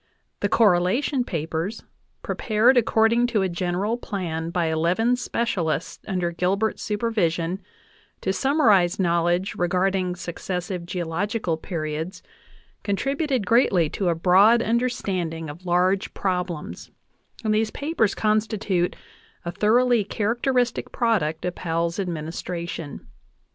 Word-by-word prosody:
The - - 0
"Correlation 225 +7 +3
Papers," 165 +2 -3 0.4
pre - - -2
pared 225 +4 +3
according 230 0 +3
to 220 -5 +1
a - - +1
general 180 +6 -1
plan 170 -8 -4
by 170 0 0
eleven 170 +10 +2
specialists 190 -10 -2
under 180 -4 -1
Gilbert's 195 +5 0
supervision 195 -5 -1 0.6
to 190 - 0
summarize 210 - +3
knowledge 175 +1 +1
regarding 180 +1 0
suc 175 -1 -7
cessive 180 -1 -4
geological 180 +2 -2
periods, 160 +1 -5 0.6
contributed 270 - -1
greatly 185 - +3
to 190 -3 0
a 170 - +1
broad 195 +8 +5
un 230 +2 +2
derstanding 180 -10 -2
of 175 +5 -13
large 180 +2 +1
problems; 180 -4 -3 0.5
and 215 -1 +1
these 215 0 +1
papers 285 -5 0
constitute 215 -4 0 0.5
a 170 - -2
thoroughly 230 +4 +3
characteristic 240 +4 0
product 185 -11 0
of 180 - -1
Powell's 170 +1 -2
administration. 170 -2 -5
190 Hz, 115 wpm, -24 LUFS, 170-225 Hz, 0.6 s, broad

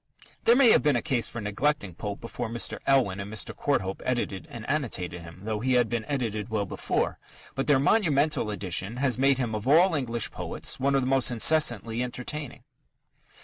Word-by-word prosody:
There 235 - +6
may 250 -3 +6
have - - +5
been 150 -3 +2
a 120 - +1
case 130 -7 0
for 115 - -6
neglecting 105 0 -1
Pope 100 +4 -6
before 115 -1 -5
Mr. 115 0 -3
Elwin 125 -8 +3
and 100 +1 -6
Mr. 110 - -3
Courthope 95 -10 -1
edited 110 -8 -2
and 115 -1 -9
annotated 90 - -2
him 85 +2 -12
though 110 0 -2
he 130 +3 0
had 120 -2 +3
been 115 -2 -2
edited 115 -6 -3
well 110 -2 -1
before - - -2 0.3
but 135 - -3
their 145 -2 +5
monumental 145 - +2
edition 100 +2 -3
has 130 -2 0
made 135 0 +4
him 120 -4 -2
of 105 +3 -4
all 170 +6 +5
English 120 -6 0
poets - - -4
one 140 +1 +1
of 135 - +3
the - - -2
most 135 -1 +3
incessantly 120 -3 +2
entertaining. 125 +3 -4
120 Hz, 190 wpm, -27 LUFS, 105-140 Hz, 0.3 s, There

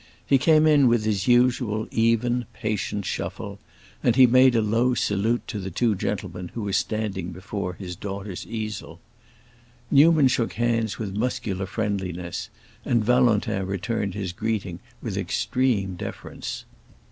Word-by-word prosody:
He 135 - +4
came 155 +2 +5
in 145 -4 +5
with 120 -2 +3
his 105 -3 0
usual 120 -3 +2
even, 115 +2 +1
patient 105 -2 -3
shuffle, - - -4 0.4
and 120 - +2
he 130 -1 +8
made 130 +1 +5
a 115 - +4
low 115 +4 +2
salute 110 +3 0
to 105 - -3
the 95 -1 -5
two 110 +5 +1
gentlemen 90 -2 -4
who 115 - -3
were 100 -1 -3
standing 100 -3 -1
before 95 0 -5
his 90 -1 -7
daughter's 100 -1 -6
easel. 110 -7 -5 0.9
Newman 150 0 +6
shook 120 -2 0
his 120 +1 0
hands 115 -4 0
with 105 -4 -4
muscular 110 -4 -2
friendliness, 95 -5 -3 0.3
and 115 -3 +1
Valentin 120 -5 +2
returned 100 0 -2
his 95 -4 -3
greeting 100 -4 -3 0.2
with 105 -5 -3
extreme 100 +1 0
deference. - - -6
110 Hz, 145 wpm, -24 LUFS, 95-120 Hz, 0.9 s, he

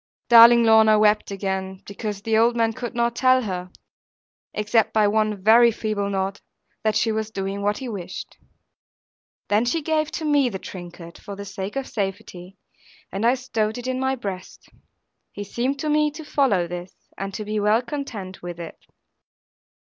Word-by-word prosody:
Darling 235 0 +9
Lorna 220 -1 +6
wept 210 0 +3
again, 190 -1 -4
because 205 0 -6
the 225 -1 0
old 230 +2 +4
man 225 -1 +1
could 240 +1 -6
not 235 0 0
tell 255 0 +3
her 185 -3 -4 0.8
(except 210 +1 +1
by 215 -1 +4
one 215 0 0
very 235 +3 +7
feeble 215 -2 -2
nod) 195 0 -2 0.4
that 215 -1 +1
she 225 - +2
was 220 0 -2
doing 195 -1 -4
what 205 +1 0
he 265 - -6
wished. 185 -5 -7 1.1
Then 210 +2 +2
she 295 +6 -1
gave 310 0 0
to 320 - -4
me 290 -4 +3
the 195 - -5
trinket, 175 -2 -10
for 200 - -8
the 200 +1 -8
sake 195 +2 -6
of 270 -1 -3
safety; 195 -2 -5 0.5
and 195 +3 -3
I 245 - +4
stowed 225 -4 -2
it 245 - -7
in 255 0 -2
my 265 0 0
breast. 195 -6 -8 0.6
He 205 - -6
seemed 245 +7 -2
to 310 - -2
me 300 0 +3
to 315 0 -9
follow 250 -13 +2
this, 175 +1 -7 0.2
and 195 0 -5
to 215 - -5
be 210 0 -2
well 210 +3 +2
content 235 -8 -6
with 175 -1 -7
it. 165 -1 -9
215 Hz, 175 wpm, -23 LUFS, 195-240 Hz, 1.1 s, Darling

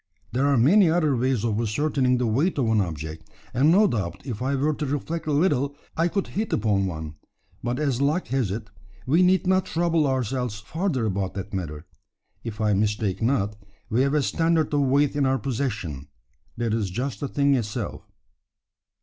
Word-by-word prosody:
There 130 +4 +1
are 140 -2 +3
many 170 - +5
other 155 -4 +2
ways 125 -2 0
of 110 -1 0
ascertaining 125 +3 +1
the 125 - 0
weight 140 - +1
of 135 - +2
an 110 -2 +3
object; 80 -2 -5 0.2
and 135 +5 +4
no 205 +5 +6
doubt 105 - -2
if 125 -4 -5
I 135 +2 0
were 145 +3 +1
to 150 +1 -3
reflect 155 +4 -3
a - - +1
little 145 -3 +1 0.2
I 165 +1 +2
could 195 +2 -1
hit 215 +3 -3
upon 100 -3 +1
one; 80 -3 -6 0.4
but 120 +1 -2
as 140 -4 0
luck 150 +6 +1
has 130 -5 0
it, 105 +3 -5 0.3
we 160 +7 +3
need 185 +1 +4
not 185 0 +2
trouble 165 -2 +1
ourselves 125 -4 -1
further 150 - -2
about 95 -2 -2
that 100 +1 -6
matter. 80 -4 -4 0.6
If 110 -3 -6
I 105 -1 +2
mistake 105 0 0
not, 110 -4 +1 0.4
we 115 +4 +3
have 140 +2 +2
a 150 - +2
standard 165 +1 +1
of 145 - +3
weight 140 +1 +2
in 140 -2 +2
our 135 0 +2
possession, 110 - -3 0.5
that 115 -2 -1
is 110 -4 0
just 120 +2 -3
the 140 - -2
thing 140 +1 +2
itself." 110 -5 -2
130 Hz, 190 wpm, -25 LUFS, 105-150 Hz, 0.6 s, no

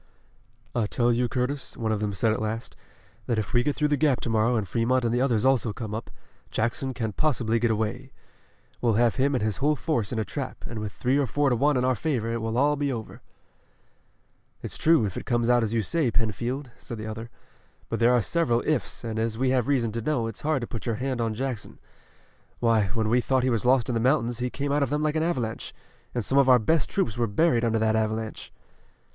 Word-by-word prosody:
"I 115 -3 0
tell 120 +2 +2
you, 120 +1 +1
Curtis," 130 +3 -2
one 110 -2 -1
of 110 - 0
them 105 -1 -1
said 110 +2 +1
at 110 - -3
last, 110 +2 -4 0.5
"that 120 - 0
if 110 - -3
we 120 - +4
get 145 +3 0
through 150 -1 +1
the 145 - +3
Gap 140 -2 +2
to 115 - -2
morrow 115 +2 +2
and 105 -4 -1
Fremont 120 +6 +1
and 115 - +1
the 120 - +1
others 120 -5 +2
also 125 -5 +2
come 110 -2 -6
up, 110 - -5 0.4
Jackson 120 +3 -1
can't 110 -4 -3
possibly 120 -7 +1
get 120 0 +2
away. 110 +5 -2 0.7
We'll 120 -2 +3
have 120 0 +2
him 135 +1 +2
and 125 - 0
his 110 -2 -1
whole 150 +2 +2
force 120 -7 -1
in 120 - -2
a 110 - 0
trap 140 -3 -6
and 115 - -6
with 105 -1 -4
three 130 +6 0
or 140 - +1
four 145 +4 +1
to - - +3
one 140 +3 +2
in 125 - +1
our 130 - +3
favor, 125 -5 -1
it 115 - -2
will 125 +7 +2
be 145 -1 -1
all 125 - -1
over." 110 - -10 1.4
"It's - - -4
true, 160 -8 +4
if 95 - -4
it - - -6
comes 120 0 +1
out 120 0 +4
as 110 -2 -1
you 115 -1 +1
say, 155 - +1
Penfield," 120 +5 -2
said 120 - -7
the 110 - -6
other, 110 +1 -6 0.6
"but - - -3
there 115 +1 +5
are 120 -3 +3
several 135 - +1
'ifs,' 155 -5 -1
and 110 -1 -3
as 110 0 -1
we 130 +1 +1
have 125 -3 +1
reason 125 -6 +1
to 115 +2 -3
know, 125 -2 0
it's 115 -2 -6
hard 150 -3 0
to 120 - -4
put 115 - -6
your 115 - 0
hand 130 +1 -2
on 115 -1 -1
Jackson. 125 -2 -4 0.8
Why, 115 -4 +3
when 110 -1 +1
we 120 +3 +3
thought 130 0 +1
he 130 - +2
was 115 +1 0
lost 130 -1 +4
in 125 - -1
the 115 - 0
mountains 120 -2 +1
he 125 +1 -1
came 140 +2 -3
out 145 +1 +2
of 140 - +1
them 150 +2 0
like 155 0 0
an 155 - +1
avalanche, 125 -10 -2 0.4
and 120 -4 -1
some 135 - +3
of 135 -1 +4
our 125 - +8
best 140 +6 +1
troops 120 - -1
were 120 - +2
buried 120 +2 +2
under 115 -1 +2
that 110 0 +2
avalanche." 110 0 -2
120 Hz, 245 wpm, -26 LUFS, 110-135 Hz, 1.4 s, our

